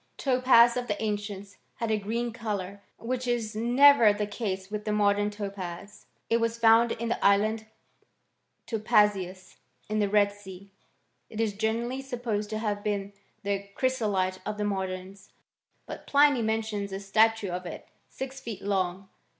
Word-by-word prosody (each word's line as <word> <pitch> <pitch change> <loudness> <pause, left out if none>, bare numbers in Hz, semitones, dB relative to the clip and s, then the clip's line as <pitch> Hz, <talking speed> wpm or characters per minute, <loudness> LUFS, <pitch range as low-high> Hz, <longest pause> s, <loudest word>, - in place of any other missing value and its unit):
Topaz 250 -3 +5
of 250 0 -3
the 205 - -2
ancients 205 -2 -4 0.2
had 230 -1 -2
a 215 - +1
green 230 +3 -3
colour, 200 -3 -4 0.2
which 250 +2 -3
is 235 -3 -1
never 240 +1 +6
the 205 0 -2
case 200 -2 -4
with 210 0 -4
the 215 - -2
modem 205 0 +2
topaz. 200 -2 -7 0.2
It 230 - +2
was 230 0 -1
found 230 0 +5
in 235 0 -4
the 235 - -2
island 215 +2 +2 1.0
Topazios, 205 -4 +1 0.3
in 215 0 0
the 205 -1 +1
Red 205 0 +3
Sea.* 200 -1 -12 0.6
It 220 - -8
is 220 -2 0
generztlly 230 +5 -2
supposed 235 -6 -3
to 215 - -3
have 210 -2 -2
been 200 -1 -2 0.3
the 200 0 -2
chrysolite 205 -8 0
of 210 0 -4
tlie 210 0 -1
modems. 190 0 -6 0.6
But - - -9
Pliny 285 -3 +4
mentions 220 -2 -2
a 195 - -4
statue 215 0 +2
of 180 0 -4
it - - -8 0.2
six 270 0 -7
feet 225 -6 -7
long. 190 -1 -1
210 Hz, 155 wpm, -27 LUFS, 200-230 Hz, 1.0 s, never